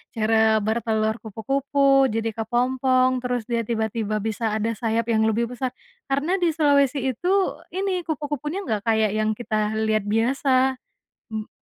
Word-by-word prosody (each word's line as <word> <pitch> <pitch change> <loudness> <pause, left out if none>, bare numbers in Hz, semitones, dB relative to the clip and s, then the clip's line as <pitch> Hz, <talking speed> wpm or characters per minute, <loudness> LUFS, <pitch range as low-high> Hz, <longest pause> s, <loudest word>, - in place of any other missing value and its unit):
cara 220 -1 +3
bertelur 220 0 0
kupu-kupu, 275 +5 +2
jadi 225 0 -2
kepompong 255 +3 +1
terus 245 -1 -2
dia 230 -1 -2
tiba-tiba 220 -2 -1
bisa 220 0 -1
ada 220 +1 0
sayap 230 +1 -1
yang 220 -1 +3
lebih 230 +2 0
besar 250 0 -4 0.3
karena 295 +8 0
di 350 - +2
Sulawesi 280 -3 +2
itu 255 +9 -6 0.5
ini 375 -2 -2
kupu-kupunya 300 +4 -3
nggak 215 -3 -3
kayak 220 -2 +3
yang 215 0 0
kita 215 -2 -2
lihat 215 -1 0
biasa, 260 +4 +2 0.5
mmm. 220 -1 -5
235 Hz, 140 wpm, -23 LUFS, 220-270 Hz, 0.5 s, cara